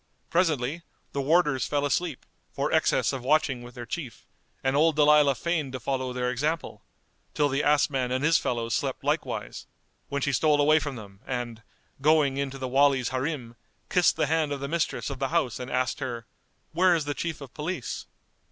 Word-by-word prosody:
Presently, 160 -3 +1 0.3
the 140 - -2
warders 150 -3 +2
fell 145 -1 0
asleep, 155 0 -1 0.3
for - - -2
excess - - +2
of 135 - -4
watching 135 -1 +1
with 120 0 -11
their 120 -1 -7
chief, 130 0 -6 0.4
and 130 +1 +1
old 160 +1 +4
Dalilah 150 -2 +5
feigned 155 -3 -2
to 130 - -4
follow 130 +1 -2
their 125 0 -1
example, 150 +6 -2 0.5
till 145 -1 +2
the 135 +1 0
ass 150 -1 +4
man 130 -3 -2
and 130 +2 0
his 165 +1 +4
fellows 115 -1 -2
slept - - -2
likewise, - - -2 0.4
when 140 -1 -2
she 140 - +1
stole 150 +3 +3
away 155 +2 +5
from 145 -3 -4
them 100 -4 -11
and, 120 -3 -4 0.4
going 150 -2 +3
in 140 0 -1
to 135 - -8
the 130 -1 -4
Wali's 135 -1 +3
Harim, 130 -3 -3 0.4
kissed 180 -2 +4
the - - +1
hand 155 0 +1
of 140 - -2
the 140 - -4
mistress 165 -2 -1
of 135 - -6
the 135 - 0
house 140 -8 0
and 125 0 -6
asked 130 +2 0
her 120 -4 -4 0.5
"Where 185 0 +4
is 160 -3 -1
the 145 - -1
Chief 165 +1 -4
of 140 -4 -11
Police?" 155 -3 -4
140 Hz, 195 wpm, -27 LUFS, 130-155 Hz, 0.5 s, Dalilah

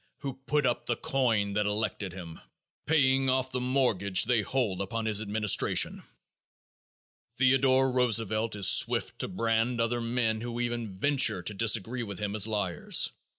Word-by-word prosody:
who 140 -2 -4
put 150 -1 +1
up 120 -1 -1
the 120 - 0
coin 115 -8 0
that 105 0 0
elected 105 -2 -3
him; 85 -3 -10 0.5
paying 135 -4 +3
off 130 0 0
the 125 - -3
mortgage 110 -8 +1
they 120 -1 +1
hold 110 -5 -2
upon 115 +3 -4
his 110 -1 +1
administration. 105 -1 +1 1.3
Theodore 130 0 +3
Roosevelt 115 -3 0
is 100 -2 +2
swift - - +2
to - - -1
brand 115 +4 -1
other 115 +1 0
men 115 -2 -1
who 120 0 -5
even 120 -5 -4
venture 115 -6 +1
to 105 - -1
disagree 115 +3 0
with 100 -5 -6
him 105 +2 -3
as 105 0 +3
liars. 105 -5 0
115 Hz, 150 wpm, -28 LUFS, 105-125 Hz, 1.3 s, paying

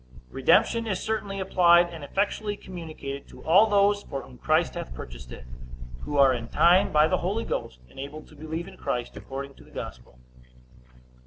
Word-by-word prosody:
Redemption 230 - +3
is 190 -4 -1
certainly 210 -3 -3
applied, 175 -2 +4
and 160 -3 -8
effectually 205 +5 -1
communicated, 155 -6 -8
to - - -14
all 190 +7 +6
those 205 0 +3
for 135 -7 -6
whom 60 - -15
Christ - - +2
hath 60 - -6
purchased 60 0 -9
it; 65 - -10 0.5
who 145 - -4
are 135 -2 +6
in 115 -1 -4
time 175 +9 +4
by 150 0 +5
the - - +1
Holy 200 +6 -2
Ghost 60 -1 -4
enabled 140 - -9
to 155 - -16
believe 160 +3 -5
in 195 - -12
Christ 125 -4 -3
according 140 +1 -7
to - - -15
the - - -19
gospel. 60 0 -9
160 Hz, 175 wpm, -26 LUFS, 135-195 Hz, 0.5 s, all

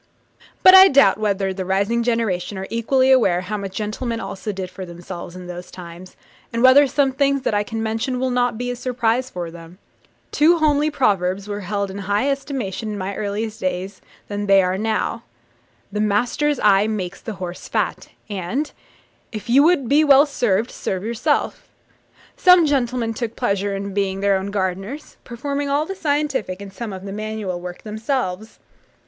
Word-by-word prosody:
But 370 - +9
I 380 0 +10
doubt 265 - +4
whether 200 -2 0
the 190 0 -4
rising 200 +5 0
generation 220 -5 -1
are 190 - -4
equally 260 +3 +2
aware 195 -9 +4
how 205 +4 -4
much 195 -2 -6
gentlemen 225 +2 -3
also 210 -1 -5
did 185 -2 -6
for 190 - -8
themselves 175 0 -8
in 180 0 -9
those 180 0 -8
times, 175 +1 -11 0.4
and 230 +1 -1
whether 270 +2 +7
some 275 0 +1
things 275 0 +1
that - - 0
I 205 - +2
can 225 +1 -4
mention 225 +3 -2
will 260 0 0
not 245 -2 +1
be 245 +1 -3
a - - -4
surprise 245 0 -1
to 175 -2 -6
them. 170 +1 -12 0.5
Two 330 +3 +4
homely 300 -1 +2
proverbs 200 - 0
were 205 0 -4
held 200 0 -3
in 200 - -7
higher 205 +7 0
estimation 260 -7 -4
in 210 - -4
my 195 +1 -4
early 210 +2 -2
days 185 -2 -4 0.3
than 205 0 -4
they 195 -1 +6
are 180 0 0
now 220 +2 -1 0.7
'The 210 +1 -2
master's 245 +8 +1
eye 205 0 +4
makes 195 -4 -4
the 225 - -6
horse 180 -2 -7
fat;' - - -2 0.2
and, 215 - -3 0.6
'If 220 +1 -6
you 270 +3 +7
would 310 -5 +3
be 290 +4 +4
well 285 -1 +6
served, 240 -5 0
serve 190 -1 -4
yourself.' 235 +7 -1 0.7
Some 360 -2 +6
gentlemen 245 -5 0
took 230 0 -4
pleasure 200 -4 -1
in 200 0 -5
being 195 -1 -1
their 200 0 +3
own 190 +1 -2
gardeners, 195 +8 -4
performing 280 +4 -4
all 290 +2 +1
the 390 - -5
scientific, 290 - -1
and 200 -1 -9
some 225 +1 -6
of 190 0 -8
the 195 - -6
manual, 210 -4 -4
work 180 0 -8
themselves. 220 -2 -3
215 Hz, 180 wpm, -21 LUFS, 190-255 Hz, 0.7 s, I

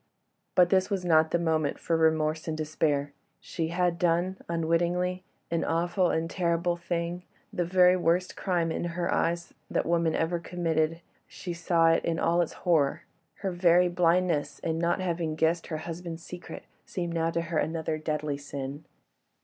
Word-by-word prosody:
But 180 -1 +5
this 190 0 +3
was 195 -3 -2
not 160 -2 +4
the - - +2
moment 160 -3 0
for 165 - -1
remorse 160 0 +1
and 155 -1 -2
despair. 150 -2 0 0.3
She 165 -2 -3
had 175 0 0
done—unwittingly—an 175 0 -1
awful 175 +2 +1
and 160 +1 0
terrible 170 0 0
thing—the 175 +1 -4
very 180 +1 +5
worst 180 +1 +1
crime, 175 -4 0
in - - -2
her 175 0 0
eyes, 170 +1 -1 0.2
that - - 0
woman 170 -1 +1
ever 170 +1 0
committed—she 165 +1 -3
saw 170 -1 +3
it 165 - +2
in 165 -1 0
all 170 +1 +2
its 170 - -2
horror. 155 -6 +2 0.4
Her 190 - +1
very 175 0 +4
blindness 175 -3 +1
in 160 -1 -1
not 170 +2 +1
having 170 -3 -1
guessed 160 +2 +1
her 155 - -3
husband's 165 -1 -6
secret 180 0 -9 0.2
seemed 175 -2 -4
now 165 0 +1
to 170 0 -1
her 165 -1 -1
another 160 -1 -2
deadly 150 -2 -2
sin. 140 +1 -6
170 Hz, 155 wpm, -28 LUFS, 160-175 Hz, 0.4 s, But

